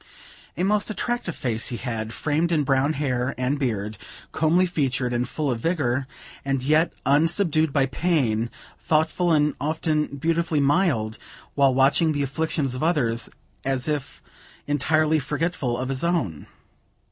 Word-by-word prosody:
A 175 - 0
most 210 +2 +1
attractive 215 -3 -2
face 115 -3 -2
he 120 - -3
had, 110 0 -4
framed 155 +6 0
in 155 -3 +2
brown 135 +2 +2
hair 130 -3 -1
and 130 +3 0
beard, 105 -5 -2 0.3
comely 165 +4 +3
featured 130 -7 -1
and 120 +1 -1
full 150 -3 -1
of 120 - -2
vigor, 135 -4 0 0.4
as 135 -2 -1
yet 155 +2 +4
unsubdued 160 +2 +2
by 135 -1 +3
pain; 135 -8 0 0.3
thoughtful 160 +3 +1
and 150 -1 +3
often 155 -1 0
beautifully 165 +1 0
mild 140 - +1 0.3
while 140 -2 +4
watching 140 +4 +3
the 145 -1 0
afflictions 145 -1 -1
of 125 - -4
others, 125 -8 +1 0.3
as 135 -1 -1
if 150 -3 -3 0.4
entirely 155 +2 +2
forgetful 145 -3 -2
of 130 +1 -3
his 135 +2 -2
own. 165 - -1
145 Hz, 145 wpm, -24 LUFS, 130-160 Hz, 0.4 s, yet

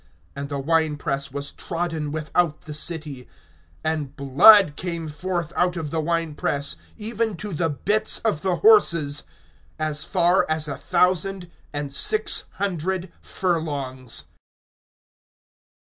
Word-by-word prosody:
(20)And 140 0 -5
the 140 - -3
wine 155 +1 +1
press 140 -1 -3
was 140 +1 -5
trodden 165 -4 -3
without 155 +1 0
the 155 - -8
city, 150 -4 -2 0.6
and 155 -3 -2
blood 150 +6 +7
came 170 -2 -4
forth 170 +2 -3
out 180 0 +1
of 155 -3 -4
the 165 - -1
wine 165 0 -1
press, 140 -1 -2 0.2
even 220 -2 -1
to 205 +2 -5
the 165 +1 0
bits 205 - 0
of 210 -9 -1
the 185 -2 0
horses, 170 - +5 0.6
as 155 -1 -1
far 175 +1 +3
as 155 -1 0
a 140 - -3
thousand 180 +5 0 0.2
and 145 -1 -4
six 430 - +1
hundred 185 -1 -2
furlongs. 140 -8 -3
160 Hz, 130 wpm, -23 LUFS, 145-180 Hz, 0.6 s, blood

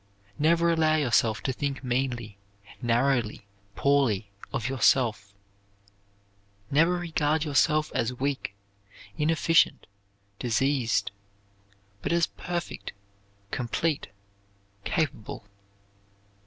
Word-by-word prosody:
Never 170 +2 +4
allow 160 -1 +3
yourself 120 -8 +2
to 130 - 0
think 140 0 -3
meanly, 120 -5 -2 0.4
narrowly, 120 -3 +1 0.3
poorly 120 -8 +2 0.2
of 115 - -2
yourself. 115 -6 +2 1.4
Never 165 +5 +4
regard 160 -3 0
yourself 150 +1 +2
as 115 +1 0
weak, 130 -5 -3 0.6
inefficient, 165 +1 +3 0.5
diseased, 125 0 +1 0.9
but - - -2
as 170 -1 +3
perfect, 175 -1 -5 0.6
complete, 140 +5 -1 0.8
capable. 140 - -2
135 Hz, 80 wpm, -27 LUFS, 120-155 Hz, 1.4 s, Never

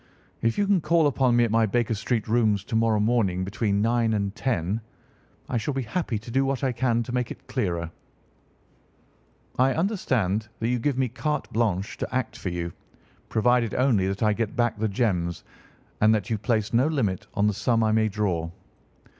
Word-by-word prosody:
"If 115 0 +1
you 205 - +2
can 195 -3 +3
call 165 +1 +3
upon 130 -3 +2
me 120 - +5
at 115 - 0
my 115 0 +3
Baker 120 +2 0
Street 110 +1 -1
rooms 110 -3 +2
to 110 - -5
morrow 110 -1 +3
morning 105 -5 +1
between 100 0 0
nine 115 -1 +2
and 100 -2 -1
ten 110 -5 -1 0.7
I 125 - -1
shall 130 +5 -2
be 135 - -1
happy 125 -2 -2
to 115 +3 -9
do 135 +3 +2
what 135 0 -1
I 130 - +2
can 120 -1 +1
to 120 - -7
make 125 -1 0
it - - -9
clearer. 85 -3 -2 1.7
I 130 +1 +4
understand 125 - 0
that 115 - -1
you 125 0 +1
give 135 +2 0
me 130 -1 +2
carte 150 +5 -3
blanche 100 -4 -1
to - - -3
act 130 -1 -1
for 95 - -4
you, 85 -1 -4 0.6
provided 120 0 +2
only 120 -8 +2
that 100 +3 -2
I 105 -1 +4
get 110 0 -2
back 120 -3 0
the 110 - +1
gems, 95 -6 -1 0.6
and 110 +1 +5
that 105 0 -3
you 110 - 0
place 110 0 0
no 125 +5 +4
limit 110 - -1
on 100 - +2
the 105 - +2
sum 115 +2 +1
I 110 - +2
may 110 0 +2
draw." 95 -6 -1
115 Hz, 195 wpm, -25 LUFS, 105-125 Hz, 1.7 s, me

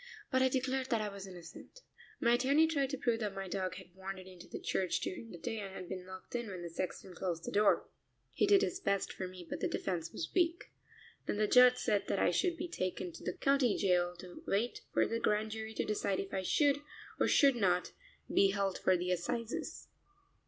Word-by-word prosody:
But 260 -1 +3
I 260 - +5
declared 260 0 -1
that 230 - +2
I 210 - -2
was 195 -1 -7
innocent. 180 - -11 0.4
My 235 -1 +4
attorney 275 +6 +4
tried 285 -4 +1
to 275 - -2
prove 240 -3 +1
that 210 -3 -3
my 195 0 -4
dog 185 -1 -2
had 185 -2 -11
wandered 190 0 -7
into 185 -2 -12
the - - -6
church 185 -2 0
during 230 +5 -5
the 175 - -8
day 220 +6 -4
and 195 -2 -6
had 185 - -7
been 185 0 -6
locked 185 0 -10
in 240 -1 -2
when 185 -3 -6
the 170 - -6
sexton 185 +2 -4
closed 175 -2 -3
the - - -4
door. 205 0 +3 0.5
He - - +2
did 400 0 +6
his 370 -1 -1
best 200 - 0
for 185 - -4
me, 180 -1 -10
but - - -4
the - - +1
defense 165 -3 -2
was 165 - -5
weak. 345 -2 +1 0.6
Then - - 0
the 215 - +3
judge 250 +3 +7
said 210 -4 0
that - - 0
I - - +3
should 355 -3 +1
be 345 - -3
taken 185 - -3
to - - -11
the 180 - -3
county 275 -5 +3
jail 180 -2 +2
to 180 -1 -10
wait 220 +5 0
for - - +3
the 230 - -1
Grand 215 -1 +1
Jury 220 0 -5
to - - 0
decide 200 -2 0
if 195 - -5
I 190 - 0
should, 285 +8 +3 0.4
or - - +3
should 275 -3 +5
not, 180 -5 +1 0.4
be 195 - +4
held 195 -1 0
for 185 - +3
the 180 +1 -1
assizes. 220 +6 -3
200 Hz, 225 wpm, -34 LUFS, 185-250 Hz, 0.6 s, judge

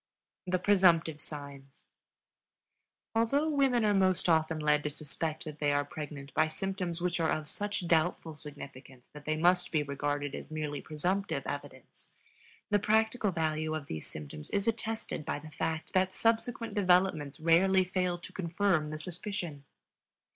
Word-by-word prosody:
THE 185 0 +2
PRESUMPTIVE 175 -5 +4
SIGNS. 140 -2 -5 1.3
Although 275 +8 +2
women 265 -5 +3
are 210 - +4
most 185 -2 +3
often 160 -1 +3
led 150 -1 +3
to 150 - -1
suspect 155 +1 -3
that 150 -1 -7
they 145 -1 +2
are 145 0 +1
pregnant 145 -1 -7
by 155 - +3
symptoms 180 0 -3
which 175 -1 0
are 160 -1 +2
of 155 -1 -1
such 205 +2 -2
doubtful 165 -1 +1
significance 135 -4 -10
that 150 0 -11
they 155 0 0
must 180 +2 +3
be 155 -3 +2
regarded 145 0 -2
as - - -7
merely 150 -2 -3
presumptive 180 +6 -1
evidence, - - -7 0.6
the 205 - +4
practical 220 +1 +2
value 155 -1 -1
of 155 -2 -4
these 80 - -5
symptoms 75 0 -8
is 200 +1 0
attested 225 -6 -2
by 145 - -2
the 155 +1 -10
fact 160 0 -3
that 185 0 +2
subsequent 230 0 0
developments 180 -7 +2
rarely 185 +4 +5
fail 180 -1 -1
to 170 - -11
confirm 180 -3 +1
the 155 - -4
suspicion. 175 -3 -5
165 Hz, 155 wpm, -31 LUFS, 150-190 Hz, 1.3 s, rarely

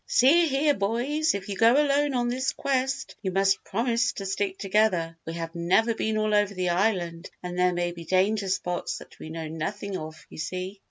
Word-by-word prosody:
"See 325 +7 +5
here, 290 +1 +2
boys, 260 +8 0
if 195 -1 -5
you 200 - -3
go 230 +4 +5
alone 290 -1 +2
on 240 -1 +1
this 255 +2 -1
quest, 265 0 -1
you 190 - -1
must 195 +1 +2
promise 230 +2 0
to 195 - -6
stick 195 0 -2
together. 190 -5 +1
We 165 - -3
have 165 -1 -5
never 180 +7 +2
been 220 -1 -1
all 215 0 +1
over 205 -1 +2
the 180 -1 0
island 175 -2 0
and 180 0 -5
there 180 0 +4
may 175 0 -1
be 170 -1 -9
danger 195 +2 +1
spots 180 -1 -2
that - - -14
we 155 - -8
know 160 0 -5
nothing 190 +5 -4
of, 155 -1 -9
you - - -10
see. 185 +4 -4
200 Hz, 205 wpm, -26 LUFS, 180-235 Hz, -, See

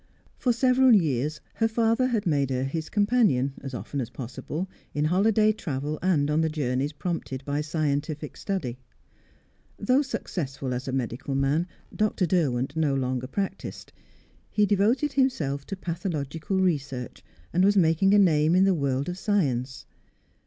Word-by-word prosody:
For 250 - +2
several 255 0 +5
years 150 - 0
her 225 - +1
father 230 +2 +2
had 230 -5 -1
made 145 -5 +1
her 130 -1 -1
his 155 +4 -3
companion, 205 - +2
as 135 -2 -6
often 140 +2 -4
as 115 - -4
possible, 135 +8 -5 0.3
in 150 +1 +1
holiday 210 +5 +3
travel 150 -7 -4
and 150 -6 +2
on 155 +2 +2
the 160 - +1
journeys 140 -2 -1
prompted 150 -5 -4
by 145 +1 -1
scientific 150 -1 -2
study. 140 - -3 1.0
Though 255 +7 +3
successful 135 - -4
as 125 +2 -4
a - - -1
medical 130 +1 -3
man, 140 +6 +1 0.3
Dr. 210 -3 +1
Derwent 145 -6 0
no 155 -4 +1
longer 130 -1 -1
practised; 195 +6 -5 0.6
he 210 - +2
devoted 225 +9 +2
himself 150 - 0
to 195 - -4
pathological 170 -2 -3
research, 140 -9 -2 0.3
and 180 +2 +3
was 200 +1 +4
making 185 +3 +4
a - - +6
name 160 -4 +4
in 185 - +5
the 195 0 +4
world 140 -3 -1
of 180 +1 -4
science. 130 - 0
155 Hz, 150 wpm, -26 LUFS, 135-200 Hz, 1.0 s, a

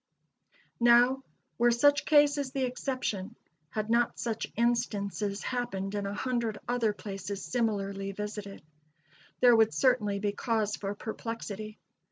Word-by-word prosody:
Now, 240 +2 +5 0.4
were 240 0 +5
such 285 +5 +4
cases 290 -2 +4
the 270 -1 -1
exception 250 -6 -3 0.3
had 215 +5 -3
not 235 0 +2
such 225 -2 -3
instances 210 -4 0
happened 210 -6 -3
in 205 -1 -2
a 200 - -3
hundred 235 -2 -1
other 240 -3 +1
places 195 0 -6
similarly 200 -4 -1
visited 205 -2 -6 0.8
there 245 -1 +7
would 225 -1 +4
certainly 235 -6 +2
be 205 0 -1
cause 215 -1 -1
for 200 0 -4
perplexity. 215 -1 -6
220 Hz, 125 wpm, -30 LUFS, 200-245 Hz, 0.8 s, there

